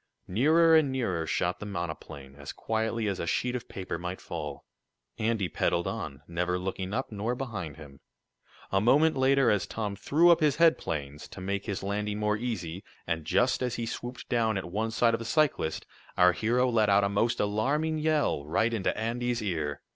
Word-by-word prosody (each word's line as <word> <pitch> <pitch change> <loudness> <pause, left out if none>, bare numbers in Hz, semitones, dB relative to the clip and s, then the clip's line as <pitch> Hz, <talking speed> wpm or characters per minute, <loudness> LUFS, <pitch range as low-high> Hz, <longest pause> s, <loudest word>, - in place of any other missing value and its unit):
Nearer 160 - +4
and 155 -4 +4
nearer 95 -11 -1
shot 90 +2 0
the - - -6
monoplane, 80 -7 -6
as 70 +1 -8
quietly 110 0 -1
as 100 -2 -2
a 85 - -3
sheet 125 +7 0
of 125 - -6
paper 95 -3 -5
might 90 +1 -5
fall. 75 -2 -6 0.5
Andy 110 -3 0
pedaled 85 +1 0
on, 70 -2 -5
never 90 +1 -1
looking 95 +1 -4
up 130 +4 -2
nor 110 +4 -2
behind 100 - -5
him, 70 -1 -12 0.7
A 95 - +2
moment 150 +8 +4
later, 135 -1 +4
as 105 -2 0
Tom 105 -3 -3
threw 165 - +4
up 170 - +5
his 150 -3 +3
headplanes, 75 - +1
to - - -10
make 100 +3 -3
his 100 -3 -3
landing 105 +1 -2
more 105 0 +1
easy, 100 -6 -4 0.2
and 80 -2 -2
just 125 +12 +2
as 125 -1 -1
he 115 - -3
swooped 120 +2 -6
down 115 -3 +1
at 95 - -3
one 110 +4 -1
side 115 +1 +2
of 115 - 0
the - - -5
cyclist, 115 - 0 0.3
our 90 0 +6
hero 120 +7 +1
let 110 -4 +2
out 100 0 +5
a - - +3
most 105 +4 0
alarming 140 +10 0
yell, 150 - +1
right 110 +9 +1
into 105 -4 -1
Andy's 120 +1 -1
ear. 80 -7 -2
105 Hz, 190 wpm, -28 LUFS, 90-125 Hz, 0.7 s, our